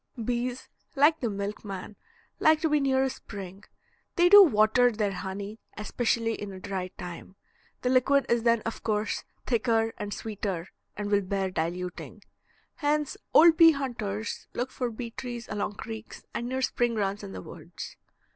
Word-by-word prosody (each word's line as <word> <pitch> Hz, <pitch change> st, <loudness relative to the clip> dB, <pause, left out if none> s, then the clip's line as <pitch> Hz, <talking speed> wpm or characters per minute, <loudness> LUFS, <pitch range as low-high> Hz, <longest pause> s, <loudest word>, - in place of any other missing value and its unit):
Bees, 245 Hz, +2 st, -2 dB, 0.3 s
like 295 Hz, +3 st, +5 dB
the 235 Hz, -, -1 dB
milkman, 200 Hz, 0 st, -5 dB, 0.4 s
like 315 Hz, 0 st, +5 dB
to 320 Hz, -, +2 dB
be 300 Hz, 0 st, +3 dB
near 265 Hz, -1 st, +2 dB
a 265 Hz, -, +1 dB
spring. 195 Hz, -4 st, -9 dB, 0.5 s
They 355 Hz, -1 st, +5 dB
do 410 Hz, +2 st, +11 dB
water 245 Hz, -, +4 dB
their 210 Hz, -2 st, -1 dB
honey, 195 Hz, +3 st, -5 dB, 0.2 s
especially 225 Hz, +1 st, 0 dB
in 205 Hz, -2 st, -6 dB
a 190 Hz, -, -8 dB
dry 190 Hz, -1 st, -3 dB
time. 180 Hz, +1 st, -8 dB, 0.5 s
The 250 Hz, -, +2 dB
liquid 270 Hz, +2 st, +4 dB
is 235 Hz, 0 st, +2 dB
then 230 Hz, -1 st, +3 dB
of 230 Hz, -, -5 dB
course 215 Hz, -1 st, -1 dB, 0.2 s
thicker 225 Hz, -2 st, +1 dB
and 205 Hz, 0 st, -4 dB
sweeter, 200 Hz, -5 st, -4 dB, 0.3 s
and 205 Hz, 0 st, -3 dB
will 205 Hz, 0 st, +4 dB
bear 190 Hz, 0 st, -2 dB
diluting. 180 Hz, +2 st, -4 dB, 0.5 s
Hence, 295 Hz, -1 st, 0 dB, 0.2 s
old 325 Hz, 0 st, +7 dB
bee 330 Hz, -1 st, +8 dB
hunters 230 Hz, -6 st, -4 dB
look 250 Hz, +2 st, -2 dB
for 250 Hz, -2 st, -2 dB
bee 230 Hz, +1 st, -6 dB
trees 240 Hz, -1 st, -6 dB
along 205 Hz, 0 st, -3 dB
creeks 220 Hz, +1 st, -8 dB
and 240 Hz, +1 st, -3 dB
near 260 Hz, +1 st, -1 dB
spring 240 Hz, -2 st, +1 dB
runs 200 Hz, -1 st, -1 dB
in 95 Hz, -, -8 dB
the 95 Hz, -, -6 dB
woods. -, -, -9 dB
225 Hz, 165 wpm, -28 LUFS, 200-255 Hz, 0.5 s, do